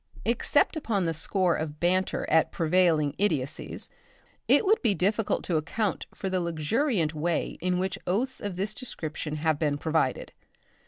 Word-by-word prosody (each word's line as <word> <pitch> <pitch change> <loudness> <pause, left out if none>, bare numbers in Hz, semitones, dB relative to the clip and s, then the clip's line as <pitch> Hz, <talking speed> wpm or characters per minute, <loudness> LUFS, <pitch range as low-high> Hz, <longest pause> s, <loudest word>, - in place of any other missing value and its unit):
Except 240 +7 +2
upon 225 - -1
the 165 -1 0
score 175 +2 +1
of 155 -1 -4
banter 185 +2 +1
at 160 +1 +3
prevailing 160 -3 +2
idiotcies, 155 -7 -2 0.6
it - - +5
would 430 +3 +3
be 215 -5 +2
difficult 205 +4 0
to 170 - 0
account 200 +7 -2
for 195 - -5
the 185 -1 0
luxuriant 170 - 0
way 160 +2 -2
in 180 +1 +1
which 190 +1 -2
oaths 240 +9 0
of 205 -3 -4
this 195 +3 -2
description 160 - -5
have 155 -1 0
been 145 -3 +1
provided. 155 -4 -1
175 Hz, 155 wpm, -27 LUFS, 155-205 Hz, 0.6 s, it